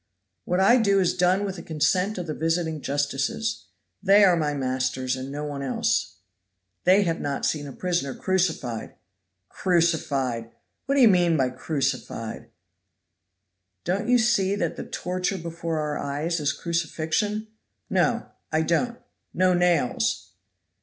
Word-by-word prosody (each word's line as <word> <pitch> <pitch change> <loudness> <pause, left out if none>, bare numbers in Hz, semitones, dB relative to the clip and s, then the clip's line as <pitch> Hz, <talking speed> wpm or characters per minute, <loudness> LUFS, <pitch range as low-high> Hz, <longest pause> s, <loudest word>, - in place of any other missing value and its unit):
"What 180 +1 0
I 200 +6 +6
do 200 -4 +3
is 180 -1 +2
done 185 +2 +2
with 195 -1 -4
the - - -7
consent 180 +6 0
of 180 - -3
the 155 - -3
visiting 160 -1 -1
justices. 145 +10 -2 0.4
They 200 +1 +6
are 185 -3 +6
my 150 -3 0
masters, 130 -1 -1
and 130 +1 -6
no 145 +1 -4
one 145 -2 -4
else." 135 -2 0 0.7
"They 190 +3 +6
have 165 -3 -1
not 140 -1 -2
seen 145 -2 -1
a - - -7
prisoner 170 -3 -2
crucified." 165 - -1 0.5
"Crucified! 145 - 0 0.4
What 275 - +1
d'ye 270 -3 +7
mean 175 -6 +4
by 130 -2 +1
crucified?" 130 -5 -3 1.3
"Don't 200 +6 -1
you 250 - +6
see 220 -5 +2
that 205 - -2
the - - -6
torture 185 +2 -2
before 165 -1 -4
our 150 -1 -2
eyes 150 +5 -2
is 145 -1 +1
crucifixion?" 170 +7 -2 0.4
"No! - - +1 0.3
I 160 0 +2
don't. 235 +9 0 0.4
No 185 0 +4
nails!" 170 - +1
170 Hz, 140 wpm, -25 LUFS, 145-185 Hz, 1.3 s, d'ye